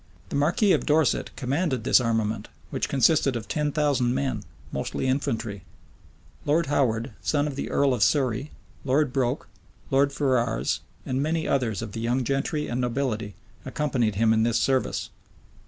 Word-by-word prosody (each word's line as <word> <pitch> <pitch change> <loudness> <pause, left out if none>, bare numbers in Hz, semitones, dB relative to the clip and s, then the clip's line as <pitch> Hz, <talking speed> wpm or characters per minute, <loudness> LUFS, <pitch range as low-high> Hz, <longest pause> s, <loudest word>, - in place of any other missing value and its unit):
The - - -4
marquis 175 - +3
of - - +2
Dorset 150 -3 +2
commanded 135 -1 -1
this 125 - +5
armament, 110 -2 -1 0.2
which - - -2
consisted 140 -1 +3
of 115 -2 -4
ten 150 -1 -1
thousand 140 -5 +1
men, 135 0 -1 0.3
mostly - - -3
infantry; 120 -7 -1 0.8
Lord 155 +3 +2
Howard, 130 -4 0
son 145 -1 +1
of 145 -2 -3
the - - -4
earl 140 -2 +2
of 120 - -2
Surrey, 130 +4 +2 0.3
Lord 140 0 +1
Broke, 130 0 0 0.4
Lord 140 +1 +3
Ferrars, 125 -5 0 0.3
and 130 +1 -1
many 160 +2 0
others 115 -6 0
of 110 - -6
the 115 - -5
young 120 +3 +1
gentry 140 +3 -1
and 120 +1 -2
nobility, 120 -5 -2 0.3
accompanied 125 -8 0
him 110 +2 +3
in 110 - +3
this 115 +1 +2
service. 130 +3 0
130 Hz, 155 wpm, -26 LUFS, 115-145 Hz, 0.8 s, this